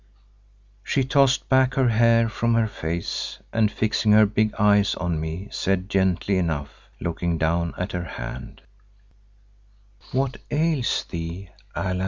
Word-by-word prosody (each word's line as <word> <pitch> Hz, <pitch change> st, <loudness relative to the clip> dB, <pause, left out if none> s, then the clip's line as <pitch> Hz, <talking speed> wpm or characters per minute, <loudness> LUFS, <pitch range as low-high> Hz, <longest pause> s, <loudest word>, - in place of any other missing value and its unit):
She 135 Hz, -, +1 dB
tossed 135 Hz, 0 st, +2 dB
back 130 Hz, 0 st, +3 dB
her 130 Hz, -2 st, +3 dB
hair 115 Hz, 0 st, +4 dB
from 115 Hz, +1 st, 0 dB
her 115 Hz, -1 st, +3 dB
face 85 Hz, -5 st, -4 dB, 0.2 s
and 110 Hz, -2 st, +2 dB
fixing 110 Hz, -1 st, +1 dB
her 110 Hz, 0 st, +7 dB
big 110 Hz, +1 st, +1 dB
eyes 105 Hz, -1 st, +3 dB
on 85 Hz, -3 st, -2 dB
me, 80 Hz, +5 st, -5 dB
said 95 Hz, 0 st, -1 dB
gently 95 Hz, 0 st, +1 dB
enough, 75 Hz, -5 st, -4 dB
looking 85 Hz, 0 st, -2 dB
down 85 Hz, +2 st, 0 dB
at 90 Hz, +2 st, -3 dB
her 90 Hz, -1 st, -3 dB
hand, 65 Hz, -5 st, -8 dB, 1.5 s
"What 135 Hz, +1 st, -1 dB
ails 150 Hz, -4 st, 0 dB
thee, 85 Hz, +2 st, -6 dB, 0.2 s
Allan?" 90 Hz, 0 st, -2 dB
100 Hz, 135 wpm, -24 LUFS, 85-115 Hz, 1.5 s, her